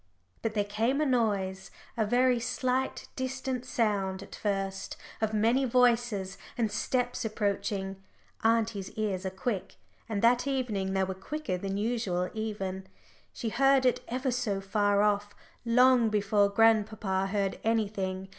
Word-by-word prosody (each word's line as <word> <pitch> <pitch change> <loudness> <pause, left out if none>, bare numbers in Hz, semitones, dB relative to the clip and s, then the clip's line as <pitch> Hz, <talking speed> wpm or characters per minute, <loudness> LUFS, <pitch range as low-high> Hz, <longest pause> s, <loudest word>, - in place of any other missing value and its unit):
But 220 -1 -2
there 205 - +2
came 225 +7 0
a 305 - +2
noise 200 -7 0 0.3
a 220 -3 0
very 245 +2 +3
slight, 250 +2 -1
distant 260 -1 -3
sound 200 -5 0
at - - -13
first 195 -2 -3 0.2
of 220 -1 +1
many 225 +5 +2
voices 240 -6 +2 0.2
and 225 -3 0
steps 245 +3 -1
approaching. 200 -3 -2 0.4
Auntie's 225 -3 +1
ears 200 -3 -2
are - - 0
quick, 190 +1 -3 0.3
and 210 -1 -2
that 245 +3 +4
evening 220 -8 -1
they 190 0 +2
were 190 0 -2
quicker 245 +4 -4
than 195 +2 -3
usual, 205 -5 -1
even. 195 -4 -4 0.4
She 230 - -4
heard 270 +2 +4
it 250 0 +3
ever 255 +2 -1
so 235 -5 -1
far 205 +1 +2
off, 205 0 0 0.3
long 250 0 +5
before 205 -1 +2
grandpapa 210 -3 +2
heard 195 -1 -1
anything. 200 -4 -1
215 Hz, 140 wpm, -29 LUFS, 195-245 Hz, 0.4 s, long